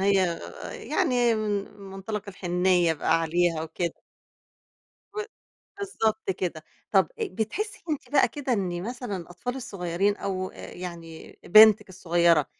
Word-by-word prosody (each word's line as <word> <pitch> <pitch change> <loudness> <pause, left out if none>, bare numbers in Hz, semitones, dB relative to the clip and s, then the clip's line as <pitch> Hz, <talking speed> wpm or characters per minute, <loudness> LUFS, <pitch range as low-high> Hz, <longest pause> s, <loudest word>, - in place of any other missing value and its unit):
هي 190 -3 +2 0.3
يعني 240 -2 +1
من 205 -2 -2
مُنطلق 195 +2 -5
الحنيّة 180 -2 +2
بقى 165 +2 +2
عليها 165 0 +1
وكده. 165 +1 -2 1.2
و 425 - -2 0.6
بالضبط 225 - -1
كده. 175 -4 -3 0.3
طب - - +5
أ 445 - 0
بتحسّي 395 - -3
أنتِ 300 - -3
بقى 280 -1 +5
كده 280 -3 -3
إن 180 -5 -1
مثلًا 240 -1 -4
الأطفال 180 +9 -5
الصغيرين 195 -4 -1
أو 185 -2 -3
يعني 170 -3 -9
بنتِك 215 +1 +8
الصغيرة، 170 -4 +3
190 Hz, 120 wpm, -26 LUFS, 175-220 Hz, 1.2 s, بنتِك